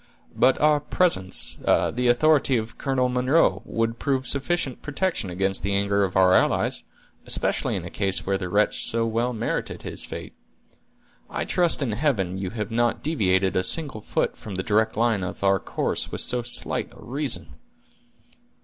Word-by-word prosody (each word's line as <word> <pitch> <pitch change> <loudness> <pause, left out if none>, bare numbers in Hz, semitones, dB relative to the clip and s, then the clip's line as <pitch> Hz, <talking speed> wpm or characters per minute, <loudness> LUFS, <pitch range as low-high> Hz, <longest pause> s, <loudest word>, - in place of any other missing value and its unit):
"But 130 - +3
our 150 0 +4
presence—the 125 - +1
authority 135 +1 +3
of 110 0 -6
Colonel 135 -2 +1
Munro—would 125 -3 +1
prove 135 -2 -1
sufficient 140 0 -1
protection 145 - -2
against 95 +2 -1
the 100 +1 -1
anger 100 0 +1
of 95 -2 -2
our 95 -1 +5
allies, - - +2 0.4
especially - - +1
in - - -4
a - - -7
case 95 -2 0
where 95 0 0
the 90 -2 -4
wretch 105 +3 +1
so 115 0 0
well 115 +2 0
merited 115 -1 -3
his - - -5
fate. - - -7 1.0
I - - -3
trust 175 -4 +3
in 125 - -1
Heaven 105 - -1
you 95 -1 -3
have 105 +2 -5
not 120 +1 0
deviated 95 - +1
a 95 - +3
single 140 - +1
foot - - -1
from 105 -3 -8
the 95 - -2
direct 110 +1 +1
line 115 -4 +1
of 90 - -6
our 95 0 +3
course - - -3
with - - -3
so 125 - +1
slight 120 +1 -1
a - - -17
reason!" 125 - -2
115 Hz, 165 wpm, -24 LUFS, 95-135 Hz, 1.0 s, our